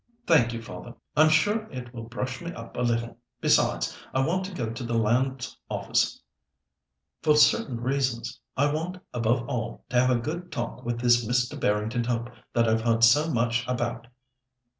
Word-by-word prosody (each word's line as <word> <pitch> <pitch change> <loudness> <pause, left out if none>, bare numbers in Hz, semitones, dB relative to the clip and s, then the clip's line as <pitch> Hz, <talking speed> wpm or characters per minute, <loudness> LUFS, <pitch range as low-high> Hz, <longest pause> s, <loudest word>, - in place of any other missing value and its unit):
"Thank 135 -9 +4
you, 115 -1 -5
father. 120 0 -9 0.2
I'm 155 +1 +6
sure 205 +8 +2
it 125 -2 -8
will 115 -2 -7
brush 130 +4 -4
me 170 0 -5
up 115 0 -10
a - - -2
little; 115 -1 -1 0.2
besides, - - +2 0.2
I 135 0 +3
want 185 +4 0
to 195 - -6
go 120 -11 -3
to 115 +2 -6
the 115 -1 -1
Lands 130 +4 0
Office - - 0 1.0
for 155 -2 +4
certain 135 -4 +4
reasons. 130 -1 -1 0.2
I 145 +2 +2
want, 170 +4 -3 0.2
above 120 0 0
all, 115 -1 -4
to 125 - +3
have 125 - +3
a 125 -2 +3
good 170 +7 -5
talk 120 -4 -4
with 120 0 -3
this 120 -1 +4
Mr. 125 +2 0
Barrington 110 +3 0
Hope 120 0 -2 0.2
that 115 -1 +3
I've 110 0 +2
heard 115 0 +2
so 145 +8 +6
much 120 -1 +1
about." 120 -1 -2
120 Hz, 180 wpm, -27 LUFS, 115-135 Hz, 1.0 s, I'm